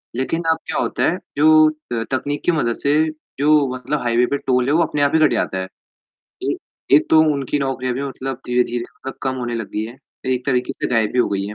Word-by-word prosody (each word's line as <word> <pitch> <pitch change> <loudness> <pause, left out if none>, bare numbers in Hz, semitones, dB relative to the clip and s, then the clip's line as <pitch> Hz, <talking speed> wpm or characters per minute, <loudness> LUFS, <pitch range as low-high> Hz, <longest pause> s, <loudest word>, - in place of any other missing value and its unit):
लेकिन 150 +7 -1
अब 160 - +1
क्या - - -2
होता - - -1
है? 175 - -2 0.2
जो 155 +1 +6 0.2
त 115 -1 -1
तकनीक 145 +2 -2
की - - +4
मदद 120 -8 0
से 140 +1 +3 0.4
जो 150 0 +4
मतलब 145 +4 -2
हाइवे 120 0 +2
पे 140 - +2
टोल 125 -2 +1
जो 140 - +1
है 155 - +4
वो 170 - +4
अपने 150 -2 -2
आप 145 0 +3
ही - - +5
कट 155 -1 +4
जाता 95 - -1
है। 95 - -2 0.9
एक - - -1 0.4
एक 145 - +6
तो 160 - +7
उनकी 140 0 -1
नौकरियाँ 130 -2 -2
भी 135 - -3
मतलब 135 -2 -5
धीरे-धीरे 120 -1 0
मतलब 135 +2 -9
कम 130 -1 -1
होने 120 -2 -3
लग 115 -3 -4
गई 105 - -2
है। 115 +3 -9 0.4
एक 125 0 -4
तरीके 125 -2 0
से - - -3
गायब 110 -2 +2
ही - - +1
हो - - +2
गई 100 -1 -1
है 105 - -6
130 Hz, 245 wpm, -20 LUFS, 120-145 Hz, 0.9 s, तो